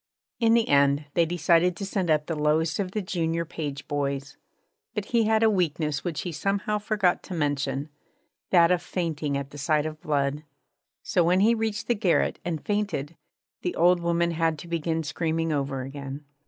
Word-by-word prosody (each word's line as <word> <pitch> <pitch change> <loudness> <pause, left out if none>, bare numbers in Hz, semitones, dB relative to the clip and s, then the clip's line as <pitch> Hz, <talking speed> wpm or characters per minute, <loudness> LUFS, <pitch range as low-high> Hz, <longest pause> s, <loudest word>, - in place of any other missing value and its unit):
In 230 -1 +4
the 230 -1 +3
end 140 +1 +3
they 170 -1 +3
decided 175 +1 +3
to 195 - -5
send 190 -3 -1
up 150 -1 +3
the 165 - -3
lowest 155 +3 +1
of 195 -2 -1
the 210 +2 -3
junior 170 -2 -1
page 145 -4 -5
boys. 140 -1 -2 0.6
But 210 -2 -2
he 230 0 +2
had 220 0 +3
a 220 - +6
weakness 155 -6 0
which 170 -4 -3
he 180 - -4
somehow 200 +6 -1
forgot 205 -4 +1
to 185 - -7
mention 145 -2 -1 0.6
that 170 -1 +5
of 180 -1 +2
fainting 160 -6 -2
at 140 0 -5
the 145 - -9
sight 150 +1 +1
of 155 0 -6
blood. 145 0 0 0.6
So 175 - +2
when 180 +3 +3
he 225 +3 +5
reached 220 -1 -2
the 240 - +2
garret 200 -6 +1
and 165 -4 -4
fainted, 200 -8 -2 0.5
the 180 - -2
old 175 +1 +4
woman 170 0 +1
had 165 -1 0
to - - -10
begin 165 -1 -1
screaming 160 +2 -1
over 135 -2 -2
again. 140 +1 -7
165 Hz, 185 wpm, -26 LUFS, 145-185 Hz, 0.6 s, a